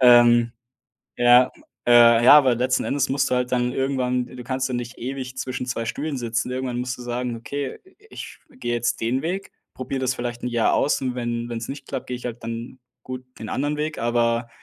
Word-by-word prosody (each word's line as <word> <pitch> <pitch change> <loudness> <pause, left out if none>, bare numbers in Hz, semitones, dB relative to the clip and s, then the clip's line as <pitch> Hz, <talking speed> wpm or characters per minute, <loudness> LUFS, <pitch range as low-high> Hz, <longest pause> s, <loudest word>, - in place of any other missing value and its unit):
Ähm, 120 -1 +6 0.6
ja, 120 +1 +6 0.4
äh, 120 -1 +7
ja, 125 - +10
aber 135 -4 +6
letzten 130 +2 +1
Endes 140 -1 0
musst 135 0 +1
du - - +2
halt 125 0 -1
dann 125 0 +1
irgendwann 125 -2 0
du 125 -1 -10
kannst 130 +1 -1
ja 130 - -3
nicht 120 -1 -5
ewig 130 0 -5
zwischen 130 -1 -3
zwei 125 -2 -2
Stühlen 145 +4 -3
sitzen, 120 0 -2
irgendwann 125 -1 -3
musst 125 0 -3
du - - -8
sagen: 120 0 -3
„Okay, 140 +4 -5
i 385 +3 -23
ich - - -9
gehe 185 - -3
jetzt 120 0 -1
den 120 +4 +1
Weg, 185 +5 -3 0.2
probiere 130 +1 -4
das 130 -1 0
vielleicht 120 -1 -5
'n 125 - -1
Jahr 120 -2 +2
aus 145 - +2
und 130 -1 -1
wenn 120 -1 -2
wenn's 115 -1 -4
nicht 135 0 -7
klappt, 130 - -4
gehe 125 - -4
ich 125 - -12
halt 120 -1 -6
dann, 115 +2 -6 0.2
gut, 130 0 -7
den 110 - -7
anderen 145 +2 -1
Weg“. 150 +1 -3
Aber, 115 0 +1
125 Hz, 215 wpm, -23 LUFS, 120-130 Hz, 0.6 s, ja